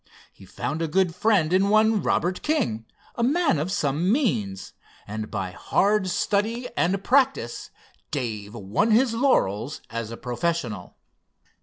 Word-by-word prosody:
He -, -, -16 dB
found 155 Hz, +3 st, -4 dB
a 165 Hz, -, 0 dB
good 180 Hz, +2 st, +1 dB
friend 180 Hz, -4 st, +2 dB
in 195 Hz, +2 st, +3 dB
one 215 Hz, 0 st, +4 dB
Robert 180 Hz, +1 st, 0 dB
King, 235 Hz, -, -1 dB, 0.3 s
a -, -, -4 dB
man 280 Hz, -, +2 dB
of 165 Hz, +5 st, -2 dB
some 165 Hz, 0 st, 0 dB
means, 115 Hz, -, -1 dB, 0.3 s
and 110 Hz, +1 st, -5 dB
by 95 Hz, -3 st, -3 dB
hard 200 Hz, -, +1 dB
study 220 Hz, +6 st, 0 dB
and 190 Hz, +3 st, 0 dB
practice 260 Hz, -, +1 dB, 0.4 s
Dave 110 Hz, -6 st, -4 dB
won 110 Hz, -, 0 dB
his 230 Hz, +2 st, +4 dB
laurels 145 Hz, -, +1 dB
as 115 Hz, -1 st, -4 dB
a 115 Hz, -, -7 dB
professional. 125 Hz, -, -3 dB
175 Hz, 140 wpm, -25 LUFS, -, 0.4 s, one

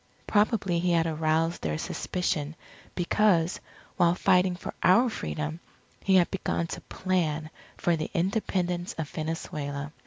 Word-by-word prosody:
Probably 205 Hz, -4 st, +2 dB
he 175 Hz, 0 st, +1 dB
had 165 Hz, -1 st, +3 dB
aroused 160 Hz, +1 st, 0 dB
their 75 Hz, -1 st, -1 dB
suspicion 155 Hz, -, -2 dB, 0.4 s
because, 180 Hz, -2 st, +2 dB, 0.4 s
while 170 Hz, 0 st, +4 dB
fighting 180 Hz, 0 st, +3 dB
for -, -, -7 dB
our 230 Hz, +7 st, +5 dB
Freedom, 155 Hz, -4 st, -4 dB, 0.4 s
he 195 Hz, -, +4 dB
had 180 Hz, -2 st, +4 dB
begun 185 Hz, -3 st, -1 dB
to -, -, -6 dB
plan 160 Hz, -4 st, -1 dB, 0.3 s
for 175 Hz, -, +2 dB
the 155 Hz, -1 st, -3 dB
Independence 180 Hz, -1 st, 0 dB
of 160 Hz, -2 st, -3 dB
Venezuela. 150 Hz, -2 st, -4 dB
170 Hz, 130 wpm, -28 LUFS, 155-185 Hz, 0.4 s, our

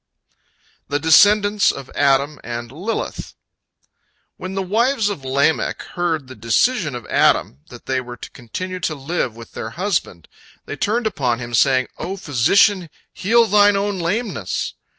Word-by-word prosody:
THE 145 Hz, +1 st, -1 dB
DESCENDANTS 205 Hz, +6 st, +5 dB
OF 135 Hz, -2 st, -10 dB
ADAM 140 Hz, +1 st, +2 dB
AND 120 Hz, 0 st, -6 dB
LILITH 185 Hz, +11 st, -5 dB, 1.0 s
When 185 Hz, +1 st, -7 dB
the 195 Hz, -, -1 dB
wives 225 Hz, +3 st, +1 dB
of 175 Hz, -10 st, -5 dB
Lamech 140 Hz, +4 st, 0 dB
heard 165 Hz, -5 st, -1 dB
the 130 Hz, -, -11 dB
decision 145 Hz, -, +1 dB
of 120 Hz, -, -7 dB
Adam, 65 Hz, -, +2 dB
that 120 Hz, -, -13 dB
they 130 Hz, -1 st, -1 dB
were 120 Hz, -1 st, -9 dB
to -, -, -10 dB
continue 185 Hz, +10 st, -6 dB
to 160 Hz, -3 st, -2 dB
live 140 Hz, -4 st, -3 dB
with 115 Hz, -1 st, -12 dB
their 110 Hz, -, -6 dB
husband, 155 Hz, -, -3 dB, 0.4 s
they -, -, -6 dB
turned 220 Hz, -, -1 dB
upon 130 Hz, -, 0 dB
him, 120 Hz, 0 st, -7 dB
saying, 130 Hz, +2 st, +3 dB
"O 195 Hz, +2 st, -4 dB
physician, 180 Hz, -, +2 dB, 0.2 s
heal 230 Hz, +4 st, +3 dB
thine 205 Hz, -1 st, +4 dB
own 200 Hz, -1 st, -1 dB
lameness!" 175 Hz, -, -2 dB
160 Hz, 150 wpm, -20 LUFS, 130-205 Hz, 1.0 s, DESCENDANTS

